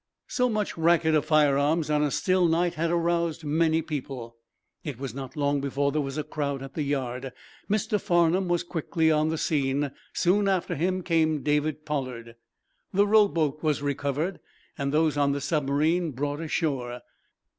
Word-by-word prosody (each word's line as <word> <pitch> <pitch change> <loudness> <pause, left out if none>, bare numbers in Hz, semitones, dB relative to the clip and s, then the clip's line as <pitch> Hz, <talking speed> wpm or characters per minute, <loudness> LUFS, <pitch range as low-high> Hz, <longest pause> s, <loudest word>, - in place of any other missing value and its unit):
So 250 -1 +1
much 210 -6 -2
racket 165 -1 +3
of 155 -2 +2
firearms 150 0 +3
on 150 0 +2
a 150 - +2
still 185 +4 +2
night 170 +1 +1
had 165 +2 -1
aroused 170 -1 0
many 160 +2 +2
people. 130 -6 -6 0.5
It 145 -6 -5
was 135 -3 -5
not 135 +2 -7
long 145 -1 +1
before 140 +1 0
there 150 +1 0
was 135 0 -4
a 155 - -1
crowd 140 -2 -3
at 135 - -9
the 155 - -3
yard. 135 -2 -2 0.4
Mr. 210 0 0
Farnum 175 +2 +2
was 175 -1 +1
quickly 160 -1 0
on 155 0 +2
the 160 - -1
scene. 140 -3 0 0.2
Soon 195 +3 +2
after 190 -3 0
him 185 +4 -1
came 160 -4 +1
David 150 +1 0
Pollard. 130 -6 -4 0.6
The 200 +2 +3
rowboat 170 -9 +3
was 150 -3 0
recovered 145 +5 -2 0.4
and 140 -2 -2
those 155 -1 +2
on 140 -1 +2
the 140 - -3
submarine 155 +3 +1
brought 145 +3 -3
ashore. 135 -7 -2
155 Hz, 165 wpm, -26 LUFS, 140-170 Hz, 0.6 s, racket